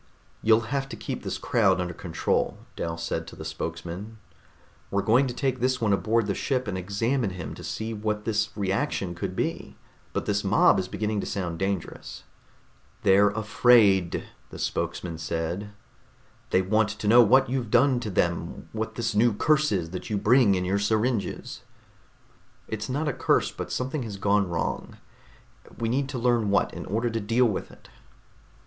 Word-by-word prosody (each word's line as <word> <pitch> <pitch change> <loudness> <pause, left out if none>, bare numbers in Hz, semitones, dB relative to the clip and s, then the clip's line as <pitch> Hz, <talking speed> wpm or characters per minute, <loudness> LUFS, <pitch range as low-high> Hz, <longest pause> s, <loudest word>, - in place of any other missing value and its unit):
"You'll 110 0 +5
have 135 -1 -1
to - - -6
keep - - -5
this - - -3
crowd - - +2
under 90 -1 -2
control," 85 -1 -1 0.2
Dal 85 0 -3
said 80 0 -3
to - - -10
the 80 - -8
spokesman. 85 +7 -6 0.7
"We're 100 0 0
going 125 +5 +4
to 125 - -4
take 130 -1 -1
this 130 +1 +1
one 110 -3 +2
aboard 110 +3 +1
the 100 - -1
ship 130 +3 -1
and 100 - -2
examine 105 +6 -1
him 90 -3 -6
to - - -10
see 110 +1 -4
what 105 0 -3
this 110 -1 0
reaction 95 -2 -1
could 85 - -4
be, - - -3 0.3
but - - -2
this 105 0 0
mob 100 0 +4
is 95 - -2
beginning 105 +2 -2
to - - -4
sound 85 -4 -3
dangerous." 95 -2 -4 0.8
"They're 100 +2 +5
afraid," 105 -3 +3 0.3
the - - -9
spokesman 85 -3 -3
said. 85 +5 -3 0.8
"They 95 - +3
want 110 +2 +2
to 105 0 -5
know 120 +3 +8
what 130 +4 +5
you've 125 -3 -2
done 125 +2 +4
to 110 - -4
them, 85 -2 -1
what 110 0 -4
this 115 -1 -1
new 110 +2 +4
curse 150 +6 +2
is 85 -5 -1
that 90 - -6
you 105 - 0
bring 105 0 +4
in 90 0 -1
your 95 +2 +1
syringes." 110 0 -1 1.1
"It's 110 +1 -4
not 145 +4 -1
a 145 - 0
curse, - - +1
but - - -6
something 130 +3 -2
has 110 -4 -5
gone 100 -1 +2
wrong. 85 -1 -3 0.8
We 115 -1 -1
need 135 +3 0
to 130 - -4
learn 120 -3 +2
what, 100 - +2
in - - -7
order 115 +4 0
to 115 - -1
deal 115 +4 +2
with 110 -5 -1
it." - - -17
105 Hz, 180 wpm, -26 LUFS, 95-120 Hz, 1.1 s, know